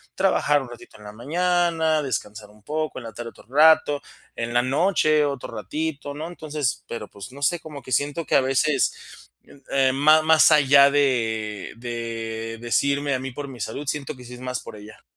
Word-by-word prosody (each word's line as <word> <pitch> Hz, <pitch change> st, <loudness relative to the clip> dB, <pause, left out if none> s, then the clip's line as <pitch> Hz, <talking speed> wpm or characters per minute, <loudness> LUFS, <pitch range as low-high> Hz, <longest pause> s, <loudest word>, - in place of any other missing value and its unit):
trabajar 150 Hz, -6 st, +2 dB
un 130 Hz, -, -9 dB
ratito 120 Hz, -1 st, -13 dB
en -, -, -14 dB
la 105 Hz, -, -8 dB
mañana, 165 Hz, +4 st, +1 dB
descansar 105 Hz, -5 st, -5 dB
un 105 Hz, 0 st, -22 dB
poco, 155 Hz, +4 st, -3 dB
en -, -, -11 dB
la 115 Hz, -, -7 dB
tarde 115 Hz, +1 st, -7 dB
otro -, -, -19 dB
rato, 145 Hz, 0 st, +5 dB, 0.4 s
en 120 Hz, 0 st, -3 dB
la 120 Hz, -, +4 dB
noche 155 Hz, +2 st, +2 dB
otro 140 Hz, -4 st, -4 dB
ratito, 145 Hz, +5 st, -4 dB
¿no?, 155 Hz, +3 st, -6 dB
entonces, 150 Hz, -6 st, -3 dB
pero 110 Hz, -3 st, -6 dB
pues 100 Hz, +4 st, -11 dB
no 140 Hz, -, -11 dB
sé, 170 Hz, +5 st, +2 dB
cómo 150 Hz, -3 st, -9 dB
que 130 Hz, -, -11 dB
siento 145 Hz, +6 st, 0 dB
que -, -, 0 dB
a -, -, +6 dB
veces, 135 Hz, +1 st, -1 dB, 0.4 s
eh, 135 Hz, -1 st, +3 dB
ma 155 Hz, +3 st, +5 dB
más 160 Hz, 0 st, +6 dB
allá 140 Hz, -2 st, +6 dB
de 110 Hz, -7 st, 0 dB
de 115 Hz, -1 st, -5 dB
decirme 140 Hz, +4 st, +1 dB
a -, -, -2 dB
mí 135 Hz, +1 st, -5 dB
por 140 Hz, +2 st, -7 dB
mi 125 Hz, -2 st, -11 dB
salud, 140 Hz, +10 st, -5 dB
siento 145 Hz, 0 st, -3 dB
que 125 Hz, -, -12 dB
sí 125 Hz, -, -10 dB
es -, -, -12 dB
más 125 Hz, 0 st, -4 dB
por -, -, -10 dB
ella. 105 Hz, +1 st, -13 dB
135 Hz, 200 wpm, -23 LUFS, 115-150 Hz, 0.4 s, a